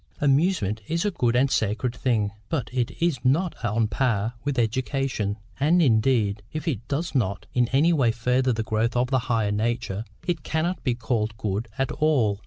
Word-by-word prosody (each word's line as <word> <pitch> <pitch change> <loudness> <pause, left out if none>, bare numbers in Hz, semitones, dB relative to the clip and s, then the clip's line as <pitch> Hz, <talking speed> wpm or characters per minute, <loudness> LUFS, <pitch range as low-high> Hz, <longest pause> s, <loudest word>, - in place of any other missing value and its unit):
Amusement 140 - +2
is 165 +4 -1
a 205 - +1
good 120 -9 +1
and 130 +2 +3
sacred 110 +3 0
thing; 110 -5 0 0.2
but 140 -9 -2
it 125 -2 0
is 165 -6 +1
not 160 +8 +2
on 115 0 +1
a - - +1
par 110 -1 0
with 145 -2 -2
education; 120 -2 -1 0.2
and, 155 +6 +4
indeed, 110 - +2
if 155 0 -5
it 120 -7 -2
does 160 +3 -2
not 105 -8 0
in 125 -1 +3
any 145 +7 +3
way 130 -7 +3
further 125 +2 +1
the 110 -1 -1
growth 110 +2 0
of 125 +2 +1
the 130 - +3
higher 110 -3 +1
nature, 110 -1 -1 0.2
it 170 -4 -1
cannot 165 +5 -2
be 125 -3 +1
called 115 -2 -2
good 105 +1 -2
at 135 -1 0
all. 125 -10 +2
125 Hz, 190 wpm, -25 LUFS, 110-140 Hz, 0.2 s, and